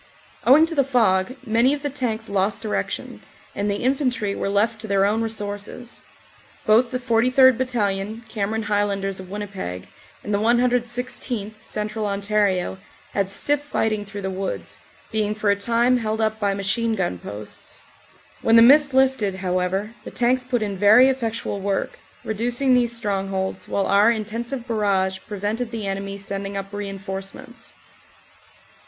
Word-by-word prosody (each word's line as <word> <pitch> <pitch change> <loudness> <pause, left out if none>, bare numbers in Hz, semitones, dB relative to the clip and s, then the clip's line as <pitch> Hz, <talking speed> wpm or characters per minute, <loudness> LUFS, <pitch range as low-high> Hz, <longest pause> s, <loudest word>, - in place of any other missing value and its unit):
Owing 290 +6 +8
to 330 - -4
the 280 -3 +3
fog 235 -4 +2
many 235 +5 +3
of 285 - -10
the 290 - -1
tanks 230 -5 -3
lost 200 +2 0
direction, 215 - -3 0.3
and 205 +1 -1
the 200 +2 -2
infantry 255 -6 0
were 195 - -2
left 215 +2 +1
to 220 - -6
their 195 -1 +3
own 215 +3 +1
resources. 220 +2 -4 0.6
Both 230 +3 +4
the 255 - -2
43rd. 255 +1 +4
Bat 260 - +1
talion, 215 -1 -2
Cameron 220 +1 -2
Highlanders 200 -2 -1
of 185 -1 -9
Winnipeg, 195 - -6 0.3
and 210 - -3
the 200 - +2
116th., 240 -2 0
Central 215 0 -3
Ontario, 200 -2 0 0.3
had 195 -1 0
stiff 290 +8 0
fighting 220 -7 -1
through 200 0 -8
the 190 - -2
woods, 190 +1 -5 0.3
being 215 -1 0
for 210 -1 +1
a - - +3
time 235 +4 +2
held 220 -2 -2
up 220 0 0
by 200 -2 +1
machine 220 +3 0
gun 175 - -2
posts. 105 +3 -8 0.6
When 225 - +4
the 230 - +9
mist 285 +2 +6
lifted, 260 -7 +2
however, 190 +3 -1
the - - -7
tanks 250 +1 +1
put 245 -3 -1
in 200 -3 -4
very 220 +6 +7
effectual 230 -5 -2
work, 195 0 -2 0.2
reducing 240 +5 +1
these 245 -2 +3
strongholds, 195 -3 -2
while 195 - 0
our 205 +3 +5
intensive 235 +3 -3
barrage 195 -4 0
prevented 210 +4 -3
the 225 -3 -5
enemy 195 0 -3
sending 200 0 -4
up 195 +1 -6
reinforcements. 195 -1 -7
215 Hz, 155 wpm, -23 LUFS, 200-240 Hz, 0.6 s, the